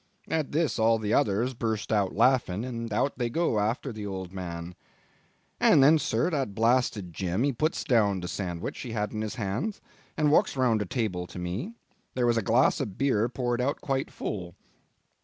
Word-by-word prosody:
At 160 -3 -1
this 155 -4 0
all 115 +1 +4
the 110 -1 -2
others 110 +5 +2
burst 110 -3 -2
out 100 -3 +1
laughing, 115 -3 +2
and 115 -2 -5
out 125 +6 0
they 120 -1 0
go 140 -5 +1
after 115 +5 -1
the 105 -1 -6
old 95 -2 -6
man. 85 -2 -6 0.9
And 135 - +6
then, 155 +3 +6
sir, 120 +6 0
that 135 -10 -2
blasted 115 -5 +1
Jim 95 +5 -1
he 140 0 +1
puts 155 +7 -1
down 105 -6 +2
the 90 - -5
sandwich 90 -3 -4
he 120 -3 -6
had 105 -2 -2
in 110 - -3
his 110 -1 -4
hand 115 - -3 0.4
and 150 -2 +3
walks 145 - +3
round 120 -4 +2
the 105 - -3
table 90 -6 -2
to - - -11
me; 90 - -4 0.4
there 125 -1 +1
was 120 -1 +3
his 115 - +1
glass 120 +3 +3
of 105 -8 -4
beer 125 -5 +2
poured 120 0 -1
out 140 +3 0
quite 135 -1 -2
full. 90 -4 -5
115 Hz, 195 wpm, -28 LUFS, 100-130 Hz, 0.9 s, And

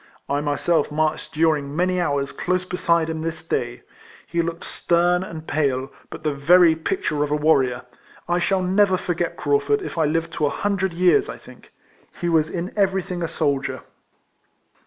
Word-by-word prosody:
I 140 +1 0
myself 150 +2 0
marched 155 +1 -1
during 150 -3 +1
many 180 +1 +1
hours 140 -4 -1
close 185 0 -1
beside 170 -2 +1
him 160 -1 -4
this 165 0 -5
day. 120 -4 -2 0.4
He 170 +3 -1
looked 170 0 -4
stern 175 +1 +1
and 160 -4 -8
pale; 135 -3 0 0.2
but - - -9
the 155 -2 0
very 165 +4 +5
picture 150 -2 -1
of 150 - -2
a 150 - +1
warrior. 135 -5 +2 0.4
I 175 +1 +1
shall 185 +1 +1
never 190 +1 +3
forget 175 -1 -2
Craufurd 145 0 +1
if - - -5
I 160 - +3
live 165 +2 -1
to 150 -2 0
a - - +1
hundred 190 +1 -1
years, 185 - +3
I - - -6
think. - - -16 0.5
He 175 - -1
was 160 -2 +2
in 175 +1 -4
everything 190 -3 0
a 165 - -1
soldier. 145 -4 -1
165 Hz, 175 wpm, -22 LUFS, 145-180 Hz, 0.5 s, very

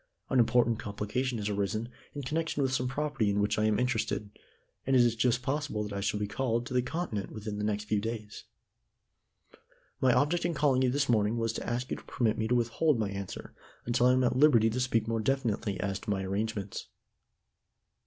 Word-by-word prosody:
An 130 - +4
important 120 -1 +3
complication 105 +5 -2
has 105 -1 -3
arisen 105 +2 -1 0.3
in 145 - -4
connection 155 +1 -1
with 130 -1 0
some 125 -1 0
property 135 -4 -1
in 100 0 +1
which 105 +1 +1
I 105 - +2
am 110 -1 +2
interested, 115 -4 -1 0.6
and 135 - +3
it 125 - +7
is 120 -1 +2
just 125 +2 +1
possible 140 -6 -1
that 105 -1 -6
I 100 - -2
shall 105 +1 0
be 105 - 0
called 120 +2 -1
to 125 - -6
the 125 - +3
Continent 130 - -3
within 105 -1 -5
the - - -2
next 105 0 -1
few 105 -1 0
days. 110 -1 -5 1.6
My 130 - +5
object 150 +7 +2
in 170 -1 0
calling 140 -3 +3
upon 130 - +3
you - - +1
this 140 +1 +1
morning 110 -1 +2
was 115 -1 0
to - - -4
ask 125 +2 -2
you - - -1
to - - -12
permit 110 -3 0
me 110 - 0
to 125 - +2
withhold 120 +5 +2
my 105 -3 -1
answer 100 -1 -6 0.3
until 120 +1 +3
I 125 - +5
am 130 0 +3
at 125 - +2
liberty 125 -6 +5
to 125 - -2
speak 115 -3 +1
more 115 0 0
definitely 110 -4 -1
as 100 -1 -2
to - - -9
my 95 -2 0
arrangements." 100 +1 -3
115 Hz, 215 wpm, -30 LUFS, 105-130 Hz, 1.6 s, it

